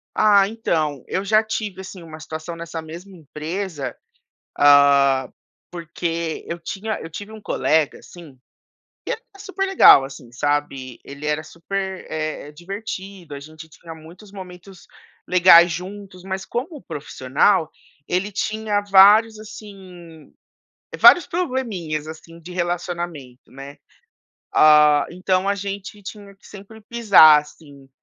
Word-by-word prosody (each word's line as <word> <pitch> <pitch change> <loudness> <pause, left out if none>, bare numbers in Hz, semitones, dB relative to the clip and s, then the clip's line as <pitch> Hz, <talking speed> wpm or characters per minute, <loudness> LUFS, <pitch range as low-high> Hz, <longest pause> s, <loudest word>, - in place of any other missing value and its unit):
Ah, 200 -2 +4
então, 155 - -2
eu 190 - -3
já 215 +2 +3
tive, 215 -3 -5
assim, 185 -1 -11
uma 160 -1 -11
situação 160 +2 -7
nessa 165 -1 -7
mesma 170 +5 -11
empresa, 155 -2 -6 0.6
ah, 140 -2 +4 0.4
porque 170 -1 -5
eu 170 - -5
tinha 205 +5 -5
eu 165 - -9
tive 205 +6 -9
um 220 - -11
colega, 160 -6 0
assim, 160 -7 -15 0.7
que - - -5
era - - -5 0.2
super 390 -1 -4
legal, 385 - +7
assim, 130 -3 -12
sabe? 135 -1 -3
Ele 140 +2 -10
era 150 0 -1
super, 190 +3 -6
eh, 155 -1 -5
divertido, 190 0 -8
a 140 - -7
gente 155 +2 -13
tinha 165 +1 -12
muitos 175 +6 -15
momentos 185 -1 -12 0.4
legais 175 -1 +6
juntos, 185 +1 -8
mas 190 0 -5
como 285 +6 -5
profissional, 150 +5 0 0.4
ele 185 +4 -2
tinha 215 0 -2
vários, 205 +3 +5
assim, 185 -7 -13 0.7
vários 355 - +7
probleminhas, 220 - -4
assim, 165 +1 -12
de 175 +2 -11
relacionamento, 175 -7 -5
né? 135 +1 -11 0.8
Ah, 150 -1 +5
então 185 +1 -1
a 200 - +1
gente 200 +1 -7
tinha 200 0 -11
que 195 - -22
sempre 205 +2 -13
pisar, 205 -10 +6
assim, 145 -2 -17
175 Hz, 130 wpm, -21 LUFS, 155-200 Hz, 0.8 s, legal